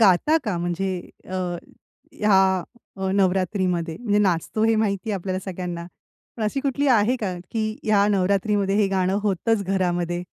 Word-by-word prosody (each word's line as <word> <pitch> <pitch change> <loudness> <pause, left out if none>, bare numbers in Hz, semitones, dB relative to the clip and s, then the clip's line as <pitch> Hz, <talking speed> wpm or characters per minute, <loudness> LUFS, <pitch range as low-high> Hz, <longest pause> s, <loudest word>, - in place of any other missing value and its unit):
गाता 215 - +5
का 210 -6 -1
म्हणजे 175 +2 -2 0.3
अ, 185 - -5 0.8
या 210 -1 +3 0.6
अ, 190 0 -2
नवरात्रीमध्ये? 185 -3 0
म्हणजे 210 -4 +1
नाचतो 200 +2 +1
हे 225 - +4
माहिती 215 0 0
आहे 205 - 0
आपल्याला 185 +1 -3
सगळ्यांना. 175 -2 -5 0.5
पण 230 - -4
अशी 215 +6 0
कुठली 280 +1 0
आहे 240 0 +4
का 205 -6 -3 0.2
की 220 -1 -1
ह्या 205 -2 +3
नवरात्रीमध्ये 200 0 +1
हे 210 -1 +3
गाणं 190 0 +1
होतंच 210 +2 +1
घरामध्ये? 175 -2 -1
195 Hz, 150 wpm, -23 LUFS, 180-215 Hz, 0.8 s, गाता